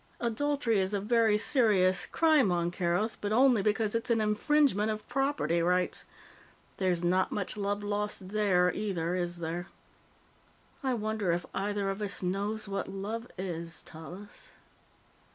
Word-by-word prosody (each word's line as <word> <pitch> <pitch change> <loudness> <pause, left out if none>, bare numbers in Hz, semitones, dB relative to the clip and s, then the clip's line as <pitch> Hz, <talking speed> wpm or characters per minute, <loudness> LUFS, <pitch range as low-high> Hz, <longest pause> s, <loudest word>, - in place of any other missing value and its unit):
Adultery 240 -1 0
is 190 +2 0
a - - 0
very 220 0 +3
serious 210 -6 +3
crime 310 - +3
on 175 0 0
Kerothi, 175 +5 -1
but 205 - -2
only 245 -1 +5
because 210 +1 +1
it's 230 +1 -1
an 230 -1 +3
infringement 215 +1 +2
of 215 0 -4
property 270 - 0
rights. 180 +1 +1 0.7
There's 180 -3 0
not 185 +2 +2
much 200 0 -2
love 205 0 -2
lost 205 -2 -2
there, 190 -4 +2
either, 180 -5 -2
is 175 -1 -2
there? 170 +1 -4 1.1
"I 260 -3 0
wonder 215 -4 -1
if 175 +1 -1
either 205 0 -1
of 195 +2 -6
us 200 -2 -2
knows 205 +4 -2
what 195 0 -3
love 215 +5 -5
is, 170 -3 -3
Tallis?" 180 +6 -10
205 Hz, 145 wpm, -30 LUFS, 180-220 Hz, 1.1 s, only